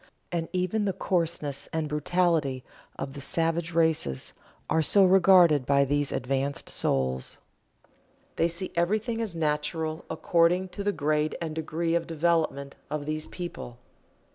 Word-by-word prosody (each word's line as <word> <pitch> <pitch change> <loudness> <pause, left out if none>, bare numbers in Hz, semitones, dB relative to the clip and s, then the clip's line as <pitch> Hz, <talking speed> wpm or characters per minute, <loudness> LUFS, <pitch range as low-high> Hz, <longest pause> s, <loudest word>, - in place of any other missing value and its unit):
And 170 -2 -2
even 185 +3 0
the 195 - 0
coarseness 165 -6 -2
and 160 -1 -1
brutality 150 -3 0 0.3
of 135 - -5
the 140 - -8
savage 165 +3 -1
races 160 - 0 0.3
are 160 - +2
so 195 +5 +5
regarded 180 -6 +6
by 140 0 +4
these 145 +1 0
advanced 135 +2 -2
souls. 65 -1 -1 1.0
They 165 - +2
see 170 +3 -1
everything 215 +7 0
as 210 -6 -1
natural 155 0 -1
according 170 +3 +2
to 200 - -6
the 205 - +1
grade 150 -2 0
and 160 -2 -4
degree 160 +1 -2
of 170 0 0
development 160 -4 0
of 150 -1 -3
these 155 +1 -2
people. 170 -9 -7
160 Hz, 140 wpm, -27 LUFS, 145-175 Hz, 1.0 s, regarded